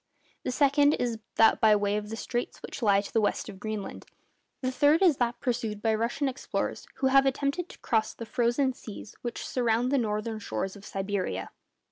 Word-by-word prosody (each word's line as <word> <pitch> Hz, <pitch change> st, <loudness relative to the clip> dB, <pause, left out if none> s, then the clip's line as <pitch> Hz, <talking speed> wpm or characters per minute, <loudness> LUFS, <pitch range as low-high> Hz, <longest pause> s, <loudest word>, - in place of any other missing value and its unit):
The -, -, -3 dB
second 285 Hz, +2 st, +4 dB
is 235 Hz, -2 st, -1 dB, 0.2 s
that 225 Hz, -, +5 dB
by 215 Hz, -1 st, +6 dB
way 205 Hz, 0 st, +1 dB
of 210 Hz, 0 st, -3 dB
the 225 Hz, -, -4 dB
straits 240 Hz, +2 st, -3 dB
which -, -, -7 dB
lie 200 Hz, -3 st, +4 dB
to 200 Hz, -, -10 dB
the 225 Hz, -, +3 dB
west 205 Hz, -, 0 dB
of 190 Hz, -, -10 dB
Greenland. 215 Hz, -1 st, -5 dB, 0.6 s
The 255 Hz, -, +1 dB
third 295 Hz, +6 st, +4 dB
is 330 Hz, -7 st, +5 dB
that 240 Hz, -1 st, 0 dB
pursued 235 Hz, -5 st, -2 dB
by 220 Hz, +1 st, +1 dB
Russian 235 Hz, +6 st, 0 dB
explorers 265 Hz, 0 st, -3 dB
who 265 Hz, -, +1 dB
have 275 Hz, 0 st, +6 dB
attempted 280 Hz, +6 st, -1 dB
to -, -, -12 dB
cross 220 Hz, -3 st, 0 dB
the 230 Hz, -, -7 dB
frozen 240 Hz, +4 st, +1 dB
seas 215 Hz, -4 st, -10 dB
which 240 Hz, -1 st, -4 dB
surround 240 Hz, 0 st, +1 dB
the 280 Hz, -, +3 dB
northern 215 Hz, 0 st, -2 dB
shores 195 Hz, -1 st, -3 dB
of 200 Hz, -1 st, -11 dB
Siberia. 190 Hz, -, -3 dB
230 Hz, 195 wpm, -28 LUFS, 210-260 Hz, 0.6 s, by